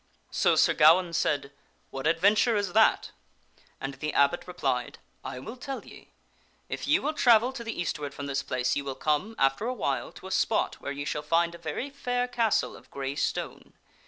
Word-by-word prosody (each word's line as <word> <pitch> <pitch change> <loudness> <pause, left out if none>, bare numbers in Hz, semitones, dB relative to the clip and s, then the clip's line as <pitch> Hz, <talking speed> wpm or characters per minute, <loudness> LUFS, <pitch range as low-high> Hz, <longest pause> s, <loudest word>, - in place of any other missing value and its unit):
So - - +3
Sir - - +4
Gawaine 170 +3 +5
said, 140 -3 0 0.2
" - - -40
What 135 +2 -3
adventure 200 +8 +3
is 200 -4 -1
that? 220 +1 +4 0.3
" - - -33
And 135 0 -4
the 150 +2 -4
abbot 140 +5 +2
re 180 - -7
plied, 125 -6 -1 0.2
" - - -40
I - - -7
will 135 - -7
tell 270 +2 -6
ye; - - -14 0.6
if - - -4
ye - - +5
will 310 - -2
travel 245 -3 +4
to 240 - -6
the 230 -4 -5
eastward 150 -4 -3
from 140 +1 -7
this 140 -1 -1
place, 125 -1 -1
ye 145 - 0
will 135 -1 -5
come, 155 +11 -1
after 135 +12 +1
a 255 - -2
while, 135 - -2
to - - -13
a 190 - -7
spot - - 0
where 140 - -4
ye 145 +1 -5
shall 150 - -2
find 170 +3 +1
a 170 - -10
very 170 - -4
telieth 280 - -22
the 245 - -2
^ 245 - +1
r 245 - +1
castle 230 -3 0
of - - -16
gray 135 0 -4
stone. - - -3
165 Hz, 225 wpm, -28 LUFS, 140-220 Hz, 0.6 s, Gawaine